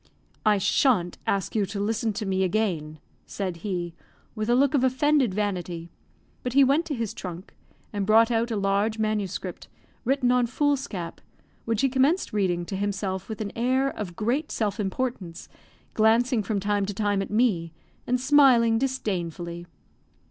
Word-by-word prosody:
"I 210 Hz, -1 st, +5 dB
shan't 195 Hz, -3 st, +2 dB
ask 195 Hz, -2 st, 0 dB
you 215 Hz, -, +2 dB
to 200 Hz, +1 st, -5 dB
listen 220 Hz, +2 st, 0 dB
to 210 Hz, +1 st, -4 dB
me 190 Hz, -1 st, 0 dB
again," 175 Hz, -6 st, -1 dB, 0.3 s
said 185 Hz, -4 st, -4 dB
he, 175 Hz, -2 st, -4 dB, 0.4 s
with 215 Hz, 0 st, -3 dB
a 240 Hz, -, +4 dB
look 275 Hz, +2 st, +3 dB
of 275 Hz, -3 st, +2 dB
offended 260 Hz, -1 st, +3 dB
vanity; 180 Hz, -4 st, -3 dB, 0.5 s
but 250 Hz, -, -3 dB
he 280 Hz, +1 st, +6 dB
went 280 Hz, +5 st, +2 dB
to 295 Hz, -, -2 dB
his 230 Hz, -4 st, -3 dB
trunk, 180 Hz, 0 st, -8 dB, 0.4 s
and 205 Hz, -1 st, -1 dB
brought 225 Hz, +3 st, +5 dB
out 230 Hz, +1 st, +1 dB
a 225 Hz, -, -2 dB
large 200 Hz, +2 st, +1 dB
MS., 215 Hz, -3 st, -1 dB, 0.6 s
written 255 Hz, -1 st, +2 dB
on 250 Hz, -1 st, +3 dB
foolscap, 255 Hz, -, -2 dB, 0.4 s
which 225 Hz, -2 st, 0 dB
he 275 Hz, -, +4 dB
commenced 270 Hz, -, +1 dB
reading 180 Hz, -4 st, 0 dB
to 195 Hz, -, -5 dB
himself 195 Hz, -1 st, -3 dB
with 220 Hz, 0 st, -5 dB
an 205 Hz, -2 st, -3 dB
air 260 Hz, +3 st, +1 dB
of 180 Hz, -5 st, -6 dB
great 245 Hz, -, -1 dB
self 210 Hz, -2 st, -1 dB
importance, 195 Hz, -4 st, -3 dB, 0.5 s
glancing 225 Hz, +2 st, +3 dB
from 205 Hz, 0 st, -2 dB
time 205 Hz, 0 st, 0 dB
to 205 Hz, -, -4 dB
time 205 Hz, -1 st, 0 dB
at 195 Hz, -, -4 dB
me, 210 Hz, -7 st, +1 dB, 0.4 s
and 250 Hz, +1 st, +1 dB
smiling 255 Hz, -4 st, +5 dB
disdainfully. 175 Hz, -, -3 dB
215 Hz, 160 wpm, -26 LUFS, 190-250 Hz, 0.6 s, he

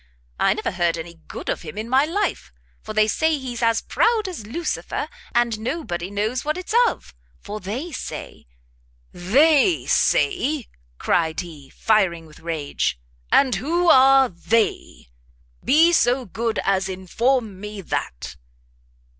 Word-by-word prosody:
I 195 Hz, +1 st, +3 dB
never 215 Hz, -, -3 dB
heard 175 Hz, -2 st, 0 dB
any 165 Hz, 0 st, -8 dB
good -, -, -8 dB
of -, -, -2 dB
him 155 Hz, +2 st, -9 dB
in 220 Hz, +1 st, -4 dB
my 265 Hz, +4 st, +3 dB
life, 345 Hz, -, -2 dB, 0.3 s
for -, -, -8 dB
they 215 Hz, 0 st, +3 dB
say 315 Hz, +7 st, +1 dB
he's 250 Hz, -3 st, -6 dB
as 230 Hz, -1 st, +2 dB
proud 460 Hz, -2 st, +2 dB
as 315 Hz, -, -7 dB
Lucifer, 325 Hz, +8 st, -3 dB, 0.3 s
and 235 Hz, -2 st, +1 dB
nobody 220 Hz, -, -4 dB
knows 215 Hz, +5 st, -2 dB
what 305 Hz, +2 st, -1 dB
it's 365 Hz, +3 st, -5 dB
of, -, -, -5 dB, 0.3 s
for 210 Hz, +1 st, -7 dB
they 235 Hz, -, -5 dB
say 250 Hz, -, -7 dB, 0.3 s
" -, -, -37 dB
"They 285 Hz, -, +3 dB
say?" 310 Hz, -, +1 dB, 0.3 s
cried 160 Hz, -, 0 dB
he, 150 Hz, -6 st, -11 dB
firing 185 Hz, -6 st, +1 dB
with 155 Hz, -1 st, -16 dB
rage, 155 Hz, -, -2 dB, 0.3 s
"and 265 Hz, -3 st, +4 dB
who 340 Hz, +5 st, +1 dB
are 265 Hz, 0 st, +6 dB
they? 215 Hz, -, -1 dB, 0.6 s
be 325 Hz, +4 st, +5 dB
so 250 Hz, -4 st, +2 dB
good 225 Hz, +3 st, -2 dB
as 195 Hz, 0 st, +1 dB
inform 210 Hz, +3 st, -1 dB
me 210 Hz, 0 st, -7 dB
that?" 70 Hz, -, -5 dB
220 Hz, 145 wpm, -22 LUFS, 180-275 Hz, 0.6 s, are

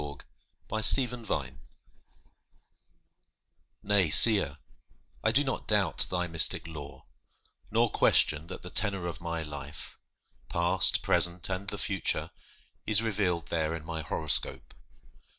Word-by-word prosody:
TO 75 Hz, -1 st, -9 dB, 0.5 s
AN 110 Hz, -, -3 dB
ASTROLOGER 120 Hz, -, +3 dB, 2.3 s
Nay, 100 Hz, -5 st, 0 dB
seer, 105 Hz, +6 st, +7 dB, 0.7 s
I 110 Hz, -, +1 dB
do 135 Hz, +5 st, +2 dB
not 135 Hz, -, -6 dB
doubt 105 Hz, -4 st, 0 dB
thy 90 Hz, -1 st, -3 dB
mystic 80 Hz, -2 st, +3 dB
lore, 70 Hz, -4 st, -11 dB, 0.6 s
Nor 115 Hz, +1 st, 0 dB
question 75 Hz, +1 st, +1 dB
that 95 Hz, -, -10 dB
the 90 Hz, -, -10 dB
tenor 100 Hz, -4 st, -2 dB
of 85 Hz, -1 st, -7 dB
my 85 Hz, -1 st, -5 dB
life, 75 Hz, -1 st, -11 dB, 0.5 s
Past, 85 Hz, +1 st, +2 dB
present, 85 Hz, +1 st, -1 dB
and 95 Hz, +1 st, -5 dB
the 105 Hz, -, -5 dB
future, 95 Hz, -1 st, -4 dB, 0.6 s
is 110 Hz, +1 st, +2 dB
revealed 95 Hz, -8 st, -3 dB
There 80 Hz, -1 st, -3 dB
in 80 Hz, -2 st, -10 dB
my 80 Hz, -1 st, -6 dB
horoscope. 80 Hz, 0 st, -4 dB
90 Hz, 120 wpm, -27 LUFS, 80-105 Hz, 2.3 s, seer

